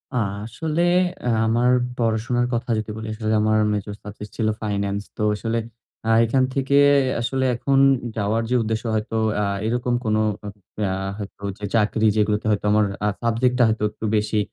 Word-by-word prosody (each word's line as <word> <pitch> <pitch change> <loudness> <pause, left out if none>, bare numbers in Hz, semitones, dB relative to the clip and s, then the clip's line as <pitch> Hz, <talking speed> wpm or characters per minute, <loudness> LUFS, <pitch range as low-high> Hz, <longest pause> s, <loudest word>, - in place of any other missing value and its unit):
আ - - +1 0.3
আসলে 155 +8 -2 0.6
আমার 120 +2 +3 0.3
পড়াশোনার 120 +1 0
কথা 120 +1 -2
যদি 110 0 -4
বলি, 110 0 -6
আসলে 110 0 -2
আমার 110 0 +3
মেজর 105 0 -3
সাবজেক্ট 105 0 -9
ছিল 110 - +1
ফাইনান্স। 100 -1 -1 0.2
তো - - -1
আসলে, 115 +2 -2 0.5
আ - - +1 0.2
এখান 130 +3 +2
থেকে 135 +1 +1 0.4
আসলে 130 +2 0
এখন 135 +3 +1 0.4
যাওয়ার 105 +2 0
যে, 125 - +1
উদ্দেশ্য 110 0 -2
হয়তো 110 +1 -2 0.3
আ - - +1 0.2
এরকম 120 +1 0
কোন 110 -1 +1 0.3
অ - - -4 0.4
আ - - -1 0.3
হয়তো 100 -1 -9
যে, 105 - -15
চাকরি, 110 0 +2
যেগুলোতে 105 0 +1
হয়তো 105 -1 0
আমার 105 0 +4 0.4
সাবজেক্ট 120 +2 +1
টা - - +6
হয়তো 110 -1 -1
একটু 110 - -7
বেশি 105 +1 0
110 Hz, 165 wpm, -22 LUFS, 105-120 Hz, 0.6 s, টা